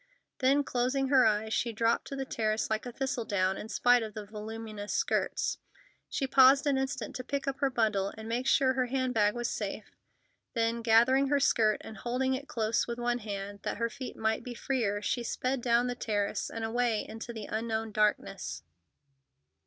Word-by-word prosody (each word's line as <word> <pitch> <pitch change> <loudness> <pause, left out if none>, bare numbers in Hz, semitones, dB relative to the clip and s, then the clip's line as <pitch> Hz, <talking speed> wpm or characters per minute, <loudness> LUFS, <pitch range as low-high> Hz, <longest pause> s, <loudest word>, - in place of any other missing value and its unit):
Then, 275 +2 +3
closing 260 +1 0
her 260 -4 +6
eyes, 215 +1 0
she 235 - 0
dropped 230 +1 +1
to 275 - -5
the 270 0 -3
terrace 220 -3 -1
like 220 +3 -1
a - - -5
thistledown, 220 -7 -1
in 215 - -7
spite 245 +1 +4
of 220 -2 -6
the 210 -1 -6
voluminous 215 0 -7
skirts. 460 +2 0 0.5
She 275 - -1
paused 265 +1 +6
an 285 -2 +3
instant 265 -2 -3
to 255 - -5
pick 280 +2 -3
up 275 0 -2
her 275 - +2
bundle 215 -6 +1
and 220 0 -8
make 240 +3 -1
sure 265 -1 +4
her 255 -1 0
hand 260 0 -1
bag 210 -1 +3
was 240 0 -1
safe, - - -4 0.6
then, 230 0 +1
gathering 240 +4 +4
her 285 +1 +2
skirt 220 -5 +3
and 220 - -9
holding 255 +4 0
it 275 +2 -4
close 225 -1 0
with 235 0 -4
one 240 0 0
hand, 200 -2 -6
that - - -3
her 230 +1 -1
feet 255 +3 -7
might 220 0 0
be 245 -2 -7
freer, 220 -6 -1
she 240 - 0
sped 255 +2 -2
down 235 0 +3
the 245 - -1
terrace 205 -4 -2
and 225 - -5
away 230 -1 0
into 225 +2 -7
the 220 -3 -6
unknown 220 0 -2
darkness. 210 - -1
235 Hz, 190 wpm, -30 LUFS, 220-260 Hz, 0.6 s, her